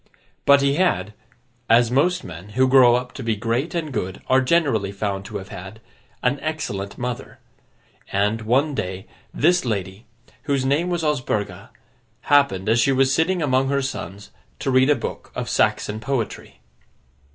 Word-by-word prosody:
But 140 Hz, 0 st, +6 dB
he 140 Hz, +1 st, +2 dB
had—as 120 Hz, -, 0 dB
most 180 Hz, +8 st, +2 dB
men 90 Hz, +4 st, -9 dB
who 130 Hz, 0 st, +5 dB
grow 130 Hz, -2 st, +6 dB
up 125 Hz, 0 st, -3 dB
to -, -, -7 dB
be 115 Hz, -3 st, 0 dB
great 120 Hz, -, -2 dB
and 155 Hz, -4 st, -3 dB
good 95 Hz, -5 st, -3 dB
are 130 Hz, +1 st, +3 dB
generally 130 Hz, -, +1 dB
found 100 Hz, -1 st, -3 dB
to -, -, -5 dB
have 95 Hz, -, -9 dB
had—an 110 Hz, +7 st, -6 dB
excellent 105 Hz, -11 st, -4 dB
mother; 125 Hz, -1 st, -5 dB, 0.7 s
and, 105 Hz, +3 st, +1 dB
one 135 Hz, +7 st, +1 dB
day, 95 Hz, -6 st, -4 dB, 0.3 s
this 175 Hz, +4 st, +2 dB
lady, 100 Hz, -2 st, -4 dB, 0.4 s
whose 140 Hz, -3 st, 0 dB
name 150 Hz, +6 st, +1 dB
was 175 Hz, -2 st, -1 dB
Osburga, 125 Hz, -9 st, -2 dB, 0.5 s
happened, 140 Hz, -10 st, +2 dB
as 115 Hz, +2 st, +3 dB
she 140 Hz, -, +3 dB
was 135 Hz, 0 st, +3 dB
sitting 170 Hz, +3 st, +1 dB
among 135 Hz, -1 st, +2 dB
her 140 Hz, -1 st, +1 dB
sons, 100 Hz, -6 st, -6 dB, 0.3 s
to 135 Hz, -, -2 dB
read 130 Hz, +2 st, +4 dB
a 150 Hz, -, +5 dB
book -, -, -6 dB
of -, -, -3 dB
Saxon 105 Hz, +1 st, 0 dB
poetry. 120 Hz, -1 st, -4 dB
125 Hz, 155 wpm, -22 LUFS, 105-140 Hz, 0.7 s, But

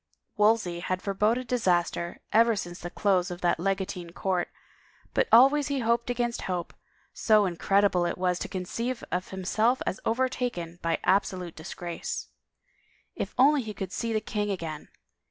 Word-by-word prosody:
Wolsey 210 Hz, -5 st, +2 dB
had 185 Hz, +1 st, -2 dB
foreboded 210 Hz, +5 st, +1 dB
disaster 175 Hz, -7 st, 0 dB
ever 230 Hz, +1 st, +5 dB
since 175 Hz, -3 st, -5 dB
the 175 Hz, -, -6 dB
close 185 Hz, 0 st, +1 dB
of 175 Hz, 0 st, -7 dB
that 175 Hz, -1 st, +2 dB
legatine 185 Hz, -2 st, -2 dB
court, 185 Hz, -2 st, -1 dB, 0.7 s
but -, -, +2 dB
always 275 Hz, +5 st, +6 dB
he 285 Hz, -1 st, -1 dB
hoped 235 Hz, +1 st, +1 dB
against 240 Hz, -1 st, -1 dB
hope, 180 Hz, -2 st, -3 dB, 0.4 s
so 215 Hz, -2 st, +4 dB
incredible 185 Hz, 0 st, +2 dB
it 170 Hz, -, -3 dB
was 180 Hz, -1 st, 0 dB
to -, -, -3 dB
conceive 230 Hz, +7 st, -3 dB
of 180 Hz, +1 st, -1 dB
himself 215 Hz, +6 st, +1 dB
as 185 Hz, -, -2 dB
overtaken 230 Hz, -8 st, -1 dB
by 165 Hz, -1 st, 0 dB
absolute 185 Hz, -2 st, +1 dB
disgrace. 170 Hz, +1 st, -5 dB, 0.9 s
If -, -, -4 dB
only 280 Hz, +3 st, +5 dB
he 215 Hz, -3 st, -7 dB
could 190 Hz, -2 st, -5 dB
see 230 Hz, +2 st, -2 dB
the 215 Hz, -1 st, 0 dB
king 210 Hz, -1 st, -2 dB
again 165 Hz, -6 st, -4 dB
195 Hz, 155 wpm, -27 LUFS, 175-230 Hz, 0.9 s, always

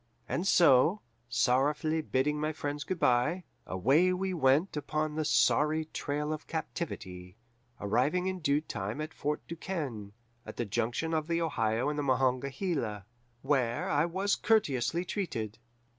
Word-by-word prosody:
And 180 Hz, +3 st, -1 dB
so, 165 Hz, +4 st, +5 dB, 0.3 s
sorrowfully 145 Hz, +6 st, +2 dB
bidding 150 Hz, +1 st, 0 dB
my 155 Hz, +1 st, -1 dB
friends 145 Hz, -1 st, -4 dB
good 185 Hz, -, -3 dB
by, 130 Hz, +9 st, +2 dB, 0.2 s
away 135 Hz, -, +3 dB
we 190 Hz, +1 st, -1 dB
went 150 Hz, +3 st, +2 dB
upon 155 Hz, +1 st, -2 dB
the 155 Hz, +1 st, -1 dB
sorry 155 Hz, +1 st, +3 dB
trail 150 Hz, +2 st, -2 dB
of 155 Hz, -, -7 dB
captivity, 95 Hz, -, -5 dB, 0.4 s
arriving 140 Hz, -, +1 dB
in 185 Hz, 0 st, -2 dB
due 145 Hz, -2 st, +2 dB
time 105 Hz, -3 st, -5 dB
at 155 Hz, +1 st, -5 dB
Fort 150 Hz, +1 st, -3 dB
Du 170 Hz, -, -5 dB
Quesne, 135 Hz, -, -5 dB, 0.3 s
at -, -, -10 dB
the 120 Hz, -, -1 dB
junction 120 Hz, +10 st, -1 dB
of 155 Hz, -1 st, 0 dB
the 170 Hz, 0 st, 0 dB
Ohio 115 Hz, -7 st, 0 dB
and 150 Hz, 0 st, -1 dB
the -, -, 0 dB
Monongahela, 130 Hz, -, 0 dB, 0.4 s
where 130 Hz, -4 st, +1 dB
I 145 Hz, +3 st, +2 dB
was 190 Hz, +4 st, 0 dB
courteously 170 Hz, -, +1 dB
treated. 115 Hz, -, -4 dB
150 Hz, 145 wpm, -30 LUFS, 125-165 Hz, 0.4 s, so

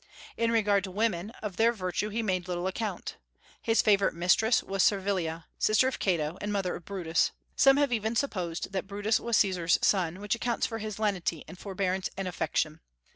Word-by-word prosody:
In 230 Hz, 0 st, +1 dB
regard 205 Hz, -3 st, +3 dB
to -, -, -7 dB
women, 200 Hz, -1 st, -1 dB
of 205 Hz, -4 st, -5 dB
their 230 Hz, +1 st, +4 dB
virtue 200 Hz, -1 st, -2 dB
he 225 Hz, +2 st, -2 dB
made 185 Hz, -4 st, -1 dB
little 175 Hz, 0 st, -2 dB
account. 195 Hz, 0 st, -4 dB, 0.4 s
His 225 Hz, 0 st, +2 dB
favorite 200 Hz, -4 st, +3 dB
mistress 180 Hz, +7 st, +3 dB
was 195 Hz, 0 st, -1 dB
Servilia, 185 Hz, -5 st, +1 dB
sister 215 Hz, +4 st, +4 dB
of 260 Hz, -, -3 dB
Cato 170 Hz, -3 st, 0 dB
and 205 Hz, -, -2 dB
mother 195 Hz, -3 st, -1 dB
of 170 Hz, -, -10 dB
Brutus. 170 Hz, -5 st, 0 dB, 0.3 s
Some 270 Hz, 0 st, +6 dB
have 285 Hz, -3 st, +2 dB
even 220 Hz, 0 st, -1 dB
supposed 180 Hz, -12 st, -2 dB
that 195 Hz, 0 st, -3 dB
Brutus 205 Hz, +3 st, 0 dB
was 235 Hz, -1 st, +1 dB
Caesar's 180 Hz, -4 st, +3 dB
son, 185 Hz, -2 st, +2 dB
which 205 Hz, 0 st, -1 dB
accounts 235 Hz, 0 st, -1 dB
for 225 Hz, -, -4 dB
his 215 Hz, -1 st, -5 dB
lenity 190 Hz, -7 st, -1 dB
and 185 Hz, -, -11 dB
forbearance 190 Hz, -1 st, -2 dB
and 195 Hz, -1 st, -3 dB
affection. 160 Hz, -2 st, -1 dB
195 Hz, 185 wpm, -29 LUFS, 180-220 Hz, 0.4 s, Some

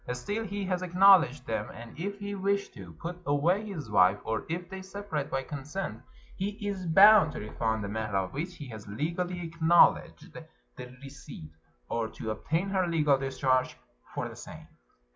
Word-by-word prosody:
Still, 205 Hz, -, -3 dB
he 200 Hz, -1 st, -4 dB
has 185 Hz, -1 st, -1 dB
acknowledged 180 Hz, -7 st, +5 dB
them; 110 Hz, -1 st, -3 dB
and 115 Hz, 0 st, -11 dB
if 200 Hz, +3 st, -4 dB
he 205 Hz, 0 st, -5 dB
wish 200 Hz, 0 st, -1 dB
to 95 Hz, -6 st, -12 dB
put 175 Hz, -, -7 dB
away 175 Hz, +8 st, +1 dB
his 175 Hz, -, -6 dB
wife, 100 Hz, -2 st, +4 dB
or 110 Hz, -, -2 dB
if 175 Hz, +2 st, -3 dB
they 190 Hz, +1 st, -7 dB
separate 190 Hz, -6 st, -5 dB
by 135 Hz, 0 st, -2 dB
consent, 145 Hz, -, -5 dB, 0.3 s
he 200 Hz, +2 st, -3 dB
is 190 Hz, -3 st, -3 dB
bound 195 Hz, 0 st, +7 dB
to -, -, -5 dB
refund 110 Hz, +1 st, -2 dB
the -, -, -3 dB
mehr 110 Hz, 0 st, -3 dB
of 95 Hz, -1 st, -1 dB
which 170 Hz, +6 st, -4 dB
he 145 Hz, -, -9 dB
has 110 Hz, -3 st, -9 dB
legally 170 Hz, -, -3 dB
acknowledged 165 Hz, +1 st, +3 dB
the -, -, -12 dB, 0.2 s
receipt, 135 Hz, -, -10 dB, 0.4 s
or 115 Hz, -1 st, -1 dB
to 110 Hz, 0 st, -6 dB
obtain 165 Hz, -, -2 dB
her 190 Hz, -2 st, +1 dB
legal 150 Hz, -5 st, +2 dB
discharge 130 Hz, -1 st, 0 dB, 0.4 s
for -, -, -2 dB
the -, -, -10 dB
same. -, -, -11 dB
160 Hz, 175 wpm, -29 LUFS, 115-190 Hz, 0.4 s, bound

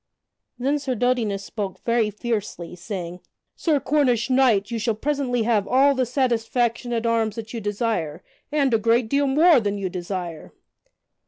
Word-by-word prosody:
Then 275 Hz, +4 st, 0 dB
Sir 270 Hz, -3 st, -2 dB
Dodinas 225 Hz, -5 st, 0 dB
spoke 200 Hz, -4 st, -5 dB
very 230 Hz, -2 st, +2 dB
fiercely, 210 Hz, -5 st, -4 dB
saying: 180 Hz, -1 st, -6 dB, 0.4 s
"Sir 310 Hz, -4 st, +1 dB
Cornish 265 Hz, -3 st, +1 dB
knight, 245 Hz, -5 st, +3 dB
you 230 Hz, -, -2 dB
shall 225 Hz, 0 st, 0 dB
presently 260 Hz, -1 st, -1 dB
have 215 Hz, -3 st, +1 dB
all 275 Hz, +2 st, +4 dB
the 255 Hz, -2 st, 0 dB
satisfaction 240 Hz, -1 st, 0 dB
at 235 Hz, -1 st, -1 dB
arms 225 Hz, -2 st, +1 dB
that 225 Hz, 0 st, -7 dB
you 230 Hz, -, -4 dB
desire 205 Hz, -6 st, -2 dB, 0.3 s
and 280 Hz, -4 st, +2 dB
a 225 Hz, -, +4 dB
great 230 Hz, +1 st, +2 dB
deal 280 Hz, +2 st, +2 dB
more 305 Hz, +3 st, +5 dB
than 205 Hz, -2 st, -2 dB
you 195 Hz, -2 st, -3 dB
desire." 175 Hz, -2 st, -6 dB
230 Hz, 160 wpm, -23 LUFS, 205-255 Hz, 0.4 s, more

